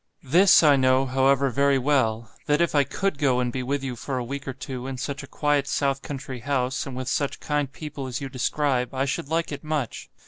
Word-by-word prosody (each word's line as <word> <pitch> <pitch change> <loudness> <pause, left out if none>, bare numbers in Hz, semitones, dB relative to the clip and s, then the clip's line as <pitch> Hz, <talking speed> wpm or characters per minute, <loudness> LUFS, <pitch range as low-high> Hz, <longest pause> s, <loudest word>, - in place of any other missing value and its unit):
THIS 175 +7 +6
I 145 -2 +6
know, 130 0 +3
however, 135 +1 +2
very 140 +2 +3
well 120 -5 +1 0.2
that 150 0 +3
if 170 -1 +1
I 145 -2 +4
COULD 170 +3 -2
go 130 -4 +2
and 125 -1 0
be 130 - -2
with 135 +2 -2
you 130 -2 -3
for 130 +3 -4
a 125 - -2
week 140 +3 -6
or 130 - -3
two 130 0 -6
in 135 -1 -5
such 140 +2 -4
a - - -10
quiet 145 -2 0
south 140 -2 0
country 135 -3 -6
house, 130 +1 -1
and 135 - -6
with 130 -1 -4
such 140 +1 -1
kind 145 -2 -1
people 150 -3 -7
as 125 -1 -4
you 140 - -5
describe, 130 -1 -1
I 135 +1 +1
should 140 0 -3
like 165 0 0
it 145 0 -6
much. 155 -6 -3
135 Hz, 235 wpm, -25 LUFS, 130-145 Hz, 0.2 s, THIS